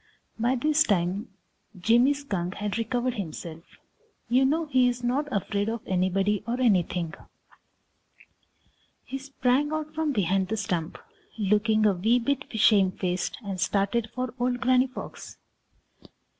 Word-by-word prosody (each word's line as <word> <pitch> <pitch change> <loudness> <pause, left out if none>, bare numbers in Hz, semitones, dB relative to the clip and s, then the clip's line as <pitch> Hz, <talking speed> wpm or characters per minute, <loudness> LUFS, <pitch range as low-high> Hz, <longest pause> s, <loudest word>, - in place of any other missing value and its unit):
By 240 +3 +2
this 300 +4 +2
time 195 - +1 0.5
Jimmy 240 +8 +4
Skunk 195 -11 -4
had 210 +2 -3
recovered 245 +2 -1
himself. 165 -5 -6 0.7
You 255 +3 +4
know 315 +4 +1
he 260 -4 +3
is 245 0 -2
not 265 +5 0
afraid 205 0 -1
of 230 0 -3
anybody 190 +2 +1
or 240 +2 -1
anything. 180 -8 +1 1.9
He 270 - -5
sprang 270 +1 0
out 310 0 -3
from 315 -1 0
behind 195 -4 +1
the 220 +3 -2
stump, 175 -6 -2 0.4
looking 215 +1 +2
a 205 - +5
wee 220 +7 +2
bit 280 +3 -1
shame 200 -3 +5
faced, 180 -1 -2
and 190 -2 -4
started 210 +4 0
for 255 -2 -3
old 245 0 0
Granny 255 +1 +3
Fox. 255 - -9
225 Hz, 135 wpm, -26 LUFS, 195-255 Hz, 1.9 s, a